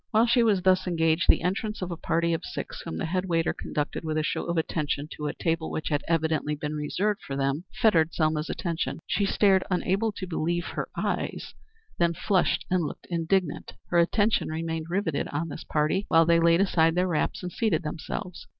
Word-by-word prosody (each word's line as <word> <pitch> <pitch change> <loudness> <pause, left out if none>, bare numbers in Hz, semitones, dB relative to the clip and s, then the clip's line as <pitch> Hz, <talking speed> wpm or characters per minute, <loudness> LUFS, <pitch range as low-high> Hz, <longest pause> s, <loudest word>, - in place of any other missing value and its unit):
While 220 +1 +4
she 240 +1 +4
was 205 -5 +3
thus 185 0 +3
engaged 165 0 +2
the - - +5
entrance 205 +3 -2
of 180 - -4
a - - -2
party 170 +1 0
of 165 - -2
six, - - -6
whom 80 - -6
the - - -2
head 180 +3 -1
waiter 165 -2 +1
conducted 150 +2 -3
with 155 -1 -2
a 155 - +1
show - - -2
of 170 0 -2
attention 150 -2 -1
to 150 - -4
a 145 - -2
table 165 -1 -1
which 155 - -3
had 145 -1 0
evidently 160 -2 +1
been 150 +1 -4
reserved 190 +8 -1
for 135 - -6
them, 140 +5 -1
fettered 165 -7 +4
Selma's 155 -1 0
attention. 165 -1 -3
She 200 - 0
stared 195 -2 +4
unable 195 +4 +1
to 195 - -5
believe 175 0 -1
her - - -4
eyes, - - -2 0.5
then 170 -1 +2
flushed 190 0 +1
and 180 -2 +2
looked 150 - -6
indignant. 170 0 0 0.2
Her 175 - +3
attention 205 +6 +2
remained 160 0 -3
rivetted 175 -5 -1
on 165 +3 -3
this 145 - -7
party 155 +6 0
while 165 0 +5
they 170 0 +4
laid 170 +2 +4
aside 165 -4 +3
their 180 +1 +2
wraps 165 +1 -1
and 180 - -4
seated 205 -8 0
themselves. 160 +3 -5
170 Hz, 205 wpm, -27 LUFS, 155-185 Hz, 0.5 s, the